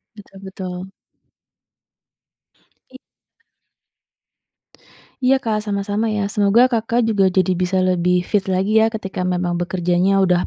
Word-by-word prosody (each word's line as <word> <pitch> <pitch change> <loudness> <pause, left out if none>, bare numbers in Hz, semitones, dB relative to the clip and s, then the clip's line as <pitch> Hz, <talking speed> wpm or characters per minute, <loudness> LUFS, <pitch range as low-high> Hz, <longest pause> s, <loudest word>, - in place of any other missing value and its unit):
Betul 200 -2 -15
betul. 185 -1 -7 2.0
I 260 - -13 2.2
Iya 265 +1 +2
Kak 220 -3 -1
sama-sama 205 +2 -2
ya. 205 -1 -2
Semoga 215 +5 +3
Kakak 230 0 0
juga 210 -4 +2
jadi 185 0 +1
bisa 185 +1 0
lebih 180 -1 +1
fit 195 +1 -1
lagi 195 +3 +1
ya 220 - +4
ketika 195 -5 -4
memang 180 -1 -1
bekerjanya 180 +2 +1
udah 180 -2 +2
195 Hz, 115 wpm, -19 LUFS, 180-215 Hz, 2.2 s, ya